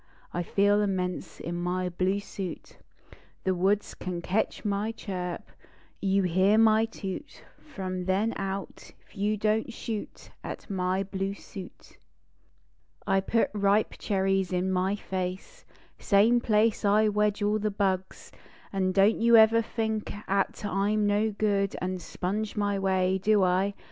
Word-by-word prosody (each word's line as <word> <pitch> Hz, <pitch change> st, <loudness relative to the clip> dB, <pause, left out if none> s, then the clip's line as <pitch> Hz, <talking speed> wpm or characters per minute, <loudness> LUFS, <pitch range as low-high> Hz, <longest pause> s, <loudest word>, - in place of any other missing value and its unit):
I 175 Hz, -, -1 dB
feel 205 Hz, +4 st, +2 dB
immense 185 Hz, -3 st, -2 dB
In 170 Hz, -, -5 dB
my 180 Hz, +1 st, -1 dB
bine 185 Hz, +3 st, 0 dB
suit. 195 Hz, -3 st, -7 dB, 0.6 s
The 190 Hz, -, +1 dB
woods 195 Hz, +3 st, +1 dB
can 180 Hz, -1 st, -5 dB
ketch 210 Hz, +5 st, -1 dB
my 205 Hz, +2 st, 0 dB
chirp; 180 Hz, -5 st, -5 dB, 0.5 s
You 195 Hz, 0 st, +2 dB
hear 185 Hz, +4 st, +3 dB
my 220 Hz, 0 st, +5 dB
toot 210 Hz, +3 st, -7 dB, 0.3 s
r 195 Hz, -, -4 dB
rom 185 Hz, -1 st, -3 dB
then 200 Hz, +5 st, +1 dB
out 195 Hz, 0 st, -4 dB
T -, -, -15 dB, 0.2 s
you 210 Hz, +1 st, 0 dB
don 215 Hz, +1 st, +1 dB
t -, -, -8 dB
shoot 225 Hz, -2 st, -6 dB
At -, -, -7 dB
my 185 Hz, 0 st, 0 dB
blue 195 Hz, 0 st, -3 dB
suit. 190 Hz, -2 st, -11 dB, 1.1 s
I 195 Hz, -1 st, +3 dB
put 230 Hz, +4 st, +1 dB
ripe 205 Hz, +1 st, +2 dB
cherries 195 Hz, -2 st, 0 dB
in 185 Hz, +1 st, 0 dB
my 185 Hz, +2 st, +1 dB
face, 190 Hz, -, -5 dB, 0.3 s
Same 220 Hz, +4 st, +4 dB
place 220 Hz, -1 st, +2 dB
I 210 Hz, +1 st, +4 dB
wedge 210 Hz, 0 st, +1 dB
all 210 Hz, +1 st, +2 dB
the 215 Hz, 0 st, 0 dB
bugs; 190 Hz, -2 st, -2 dB, 0.4 s
An 190 Hz, -1 st, 0 dB
don 195 Hz, +3 st, +5 dB
t -, -, -5 dB
you 235 Hz, 0 st, +7 dB
ever 225 Hz, +1 st, +6 dB
think 220 Hz, -1 st, -3 dB, 0.2 s
At 195 Hz, +1 st, 0 dB
I 200 Hz, +1 st, 0 dB
m 215 Hz, -1 st, +2 dB
no 205 Hz, +2 st, +2 dB
good 200 Hz, -1 st, 0 dB
An 185 Hz, 0 st, -3 dB
sponge 200 Hz, +5 st, -3 dB
my 205 Hz, -1 st, 0 dB
way. 190 Hz, -1 st, +1 dB
Do 205 Hz, 0 st, +3 dB
I? 185 Hz, +2 st, +1 dB
200 Hz, 155 wpm, -28 LUFS, 185-210 Hz, 1.1 s, you